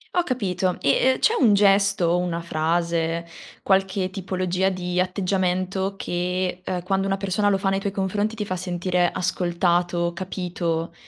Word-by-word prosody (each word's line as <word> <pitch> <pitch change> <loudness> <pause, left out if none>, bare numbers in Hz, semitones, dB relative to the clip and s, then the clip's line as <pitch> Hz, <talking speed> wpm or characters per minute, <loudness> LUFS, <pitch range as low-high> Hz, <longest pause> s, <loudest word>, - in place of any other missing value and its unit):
Ho 355 - +3
capito 190 - -1
e - - +1 0.2
e - - -5
c'è 460 - +3
un 230 -7 +5
gesto 200 -2 +4
o 170 +1 +2
una 175 -1 -2
frase, 170 +1 -1 0.3
qualche 190 -1 +1
tipologia 185 -1 -1
di 180 -1 -2
atteggiamento 185 +1 0
che, 180 0 -2
ehm, 180 -1 -3
quando 195 +2 0
una 195 0 0
persona 195 +1 0
lo 195 - +1
fa 195 - 0
nei 195 0 +1
tuoi 200 0 -2
confronti 205 +3 -1
ti 210 - -3
fa 185 -2 -3
sentire 180 0 0
ascoltato, 175 -1 0
capito, 170 -2 -3
185 Hz, 155 wpm, -23 LUFS, 175-195 Hz, 0.3 s, un